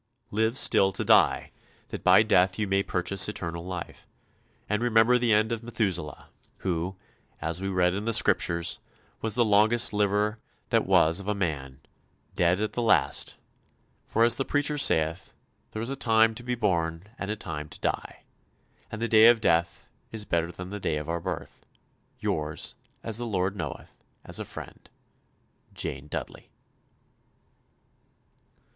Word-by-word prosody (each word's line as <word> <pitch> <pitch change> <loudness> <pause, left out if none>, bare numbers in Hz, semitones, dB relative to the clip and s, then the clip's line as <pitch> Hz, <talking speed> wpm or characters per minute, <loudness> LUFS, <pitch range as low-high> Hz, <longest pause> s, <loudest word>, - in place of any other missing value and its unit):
Live 110 +4 0
still 95 -6 +4
to 95 - -4
die, - - +4 0.4
that - - -7
by 95 +3 +6
death 95 -3 +3
you 105 -1 -1
may 95 0 +2
purchase 95 +1 +2
eternal 85 -5 -5
life, 90 -1 -7 0.6
and 105 +2 -1
remember 120 +1 +4
the 120 -1 +1
end 110 +2 +3
of 115 -1 -2
Methuselah, 95 - -3 0.4
who, 90 +1 -2 0.4
as 80 +3 -3
we 95 - -2
read 90 -2 +2
in 100 +2 -4
the 115 - 0
Scriptures, 85 -5 +1 0.4
was 110 -2 -1
the 120 - +3
longest 110 +3 +4
liver 105 +1 +1 0.3
that - - +1
was 80 +3 +4
of 100 - -9
a 105 - 0
man, 70 -8 -4 0.5
died 90 +2 +2
at 110 - -2
the 120 - -2
last; 115 -2 +2 0.7
for 115 - +2
as 120 0 +5
the 135 - 0
preacher 145 +2 0
saith, 80 - +1 0.4
there 110 - -5
is 120 - -4
a - - -2
time 115 -3 +3
to 110 - -8
be 125 0 -2
born 85 -7 -1 0.2
and 100 - -4
a 105 - -1
time 75 -7 -6
to - - -11
die, - - -4 0.7
and 110 +1 -5
the - - +1
day 110 0 +7
of 120 -1 +6
death 85 -4 0 0.2
is 110 -2 -6
better 85 -1 -1
than 90 +2 -9
the 105 - -5
day 80 -5 -1
of 75 +1 -6
our 85 0 -2
birth. 90 -2 -6 0.5
Yours, 75 0 -2 0.3
as 115 0 -1
the 120 - -3
Lord 95 -2 -1
knoweth, 80 -7 -8 0.2
as - - -3
a - - -4
friend, - - -10 0.9
"JANE 70 +2 -4
DUDDELEY." - - -7
100 Hz, 165 wpm, -27 LUFS, 85-110 Hz, 0.9 s, day